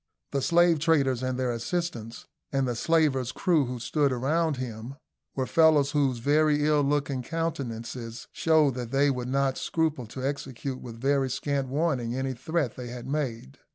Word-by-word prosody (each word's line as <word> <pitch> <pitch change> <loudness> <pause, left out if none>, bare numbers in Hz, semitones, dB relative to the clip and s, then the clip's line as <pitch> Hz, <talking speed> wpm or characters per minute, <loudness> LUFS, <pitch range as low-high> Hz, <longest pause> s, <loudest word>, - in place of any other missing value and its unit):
The 140 - 0
slave 170 +2 +4
traders 140 -6 +2
and 130 -1 -2
their 130 -1 0
assistants, 120 -2 -4 0.3
and 135 -1 +1
the 120 - 0
slavers' 135 -3 +2
crews 160 -3 +2
who 125 - -4
stood 140 +4 +1
around 150 +4 0
him, 120 +1 -6 0.4
were 130 - 0
fellows 155 -2 +4
whose 140 -4 +1
very 150 +3 +2
ill 150 -1 +3
looking 140 -2 0
countenances 120 -7 -4
showed 155 -4 +3
that 120 -1 -5
they 140 +2 +3
would 125 -2 -3
not 135 0 +1
scruple 155 -7 -1
to 130 +4 -6
execute 135 -1 -4
with 115 -2 -9
very 135 +1 +1
scant 135 +1 -1
warning 130 -4 -1
any 130 0 -2
threat 140 0 -2
they 125 -1 -6
had 120 0 -7
made. 130 - -3
135 Hz, 165 wpm, -27 LUFS, 125-150 Hz, 0.4 s, slave